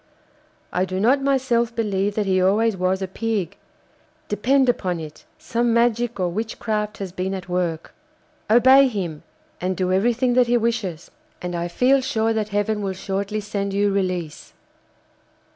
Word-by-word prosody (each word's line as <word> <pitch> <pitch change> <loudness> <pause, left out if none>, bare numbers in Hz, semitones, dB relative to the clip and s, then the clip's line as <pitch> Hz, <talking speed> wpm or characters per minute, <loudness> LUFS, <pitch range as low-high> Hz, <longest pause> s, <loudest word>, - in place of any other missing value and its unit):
I 180 - +1
do 185 0 -3
not 255 +7 +3
myself 250 -4 +1
believe 205 -3 -1
that 210 - 0
he 185 -1 +2
always 210 +4 +2
was 185 +1 0
a - - -2
pig. 205 -2 -2 0.7
Depend 260 +6 +2
upon 185 -8 0
it 155 -1 -10
some 235 0 0
magic 235 -1 +1
or 180 - +1
witchcraft 215 +1 -3
has 195 -3 -5
been 185 +2 -3
at 185 -1 -7
work. 175 -3 -2 0.6
Obey 260 +4 +7
him, 180 -10 -4 0.4
and 185 0 -1
do 185 -1 0
everything 240 +5 +2
that 250 0 +4
he 240 0 +3
wishes, 225 -8 -2 0.3
and 180 0 -5
I 170 0 -2
feel 255 +9 +3
sure 225 -4 0
that 215 -1 -2
Heaven 210 +1 -1
will 195 -1 -2
shortly 200 +3 -3
send 200 -1 -3
you 205 0 +2
release. 185 -5 -3
205 Hz, 160 wpm, -22 LUFS, 185-235 Hz, 0.7 s, Obey